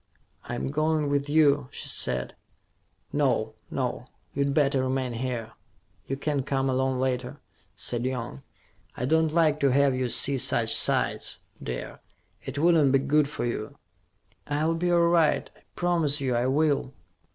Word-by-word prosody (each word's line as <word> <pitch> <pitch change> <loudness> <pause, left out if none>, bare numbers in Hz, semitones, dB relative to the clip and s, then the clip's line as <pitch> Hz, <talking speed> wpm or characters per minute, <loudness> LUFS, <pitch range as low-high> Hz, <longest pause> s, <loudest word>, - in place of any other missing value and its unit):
"I'm 120 +2 -3
going 155 0 +1
with 140 0 0
you," 145 -3 +3
she - - -5
said. 65 -1 0 0.8
"No, 125 -7 +1 0.2
no. 125 -2 -3 0.3
You'd 140 0 0
better 140 -2 +2
remain 130 -1 -1
here: 120 -2 -4 0.6
you 135 - -3
can 145 0 -1
come 135 0 -1
along 130 0 0
later," 125 -1 -2 0.4
said 120 -1 -2
Young. 125 0 -4 0.6
"I 125 - -2
don't 160 +2 +2
like 155 -2 +2
to 140 - +3
have 140 +1 +3
you 130 -1 -1
see 135 +3 +1
such - - +1
sights, - - +2 0.2
dear. 60 0 -6 0.4
It 135 +1 -6
wouldn't 155 -3 +4
be 135 - +5
good 140 +2 +2
for 150 - -4
you." 115 -2 -4 0.7
"I'll 150 +3 0
be 175 +2 0
all 175 - +4
right. 170 -2 +2
I - - -23
promise 165 -5 +1
you 130 -2 -1
I 120 +2 +1
will." 140 -1 +1
140 Hz, 150 wpm, -26 LUFS, 130-150 Hz, 0.8 s, be